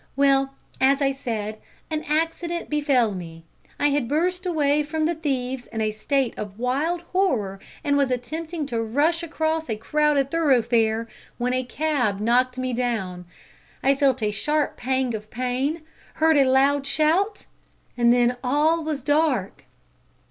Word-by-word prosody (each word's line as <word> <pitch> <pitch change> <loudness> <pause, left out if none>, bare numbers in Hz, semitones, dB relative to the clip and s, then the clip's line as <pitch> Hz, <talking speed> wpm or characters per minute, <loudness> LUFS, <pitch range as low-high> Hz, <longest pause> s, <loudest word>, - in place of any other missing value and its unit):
Well, 275 0 +3 0.3
as 270 +1 +4
I 275 -1 +2
said, 220 -5 -4 0.3
an 310 0 -2
accident 330 +2 -1
befell 280 -7 +2
me. 165 -3 -8 0.4
I 290 - +3
had 280 -4 0
burst 360 +6 0
away 300 -3 +2
from 310 +1 -1
the 335 - +1
thieves 265 -5 -3
in 225 - -6
a 215 -1 +1
state 260 +4 0
of 205 -1 -6
wild 285 +8 0
horror, 235 - +1 0.2
and 285 -2 +2
was 280 -2 +2
attempting 310 +6 -3
to 235 -4 -2
rush 290 +9 +1
across 320 -2 -2
a 220 - 0
crowded 285 +4 +1
thoroughfare, 235 -7 +2 0.3
when 250 +1 -1
a 255 0 0
cab 250 -7 -1
knocked 250 +4 +2
me 255 -1 -2
down. 215 -8 -2 0.6
I 275 - +5
felt 270 -3 +1
a 210 - +1
sharp 295 +8 -1
pang 260 -1 -1
of 215 -1 -6
pain, 255 +7 -2 0.3
heard 320 0 +4
a 270 -2 +4
loud 275 +1 +3
shout 325 +9 +1 0.5
and 235 -1 +4
then 245 0 +3
all 305 +5 +2
was 305 -4 -3
dark. 290 - 0
275 Hz, 155 wpm, -24 LUFS, 240-310 Hz, 0.6 s, I